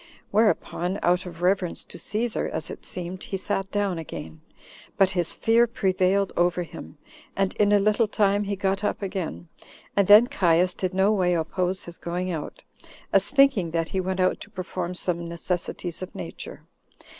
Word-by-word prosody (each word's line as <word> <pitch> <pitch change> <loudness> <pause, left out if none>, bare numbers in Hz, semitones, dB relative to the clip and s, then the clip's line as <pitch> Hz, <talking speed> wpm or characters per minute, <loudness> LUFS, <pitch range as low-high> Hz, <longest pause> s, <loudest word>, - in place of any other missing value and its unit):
Whereupon, 200 -3 +1
out 180 +1 +2
of 170 0 -8
reverence 185 -1 +1
to - - -11
Cæsar, 220 +2 -1
as - - -4
it - - -9
seemed, 180 +1 -5
he 195 - -4
sat 195 +1 -2
down 200 -4 -1
again; 80 - -8 0.6
but 190 -1 +4
his 175 -3 0
fear 230 +1 +4
prevailed 195 -2 +1
over 175 0 +2
him, 80 - -10 0.4
and 195 -1 +1
in 205 -1 +3
a 205 - +6
little 215 +3 +3
time 205 -1 +2
he 200 0 -2
got 195 +1 -1
up 205 - -1
again, 185 -3 -4 0.5
and 200 -2 +3
then 210 +3 +9
Caius 180 -8 +2
did 185 -1 -3
no 190 +2 +4
way 180 -4 +2
oppose 180 +3 -1
his 175 0 -8
going 180 +2 -3
out, 160 -4 -6 0.5
as 195 0 +4
thinking 275 -11 +4
that 165 0 -1
he 190 - -1
went 190 +1 -2
out 185 0 +2
to - - -10
perform 180 -2 -4
some 170 -2 -2
necessities 175 0 -4
of 185 - -7
nature. - - -8
185 Hz, 175 wpm, -25 LUFS, 175-200 Hz, 0.6 s, then